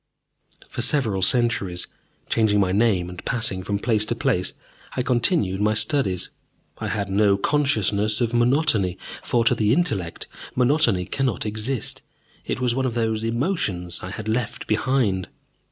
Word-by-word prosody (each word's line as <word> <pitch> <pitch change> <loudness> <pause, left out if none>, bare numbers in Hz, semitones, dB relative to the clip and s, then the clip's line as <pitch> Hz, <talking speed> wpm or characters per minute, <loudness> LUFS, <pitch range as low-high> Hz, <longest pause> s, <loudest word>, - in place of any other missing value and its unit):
For - - -5
several 110 -10 +1
centuries, 100 -4 +2 0.4
changing 110 -2 +2
my 95 -2 +2
name 100 -3 +2
and 90 0 -9
passing 110 -6 -1
from 100 +2 -2
place 110 0 +2
to 120 - -2
place, 90 -5 0 0.4
I 125 - +1
continued 120 - +1
my 105 +1 +2
studies. 105 - 0 0.5
I - - -3
had 100 -2 -2
no 100 0 +3
consciousness 110 -5 +1
of 120 -2 0
monotony, 120 - +2 0.2
for, 120 -1 0
to 120 - +5
the 110 -3 +1
intellect, 110 - -1 0.3
monotony 125 - +2
cannot 130 -3 -1
exist: 110 +3 -3 0.5
it - - -2
was 125 -2 +1
one 130 +1 0
of 120 - -4
those 110 -1 0
emotions 115 - -1
I 90 - -6
had 105 +3 -7
left 115 +1 -2
behind. 110 -9 0
110 Hz, 150 wpm, -23 LUFS, 100-125 Hz, 0.5 s, to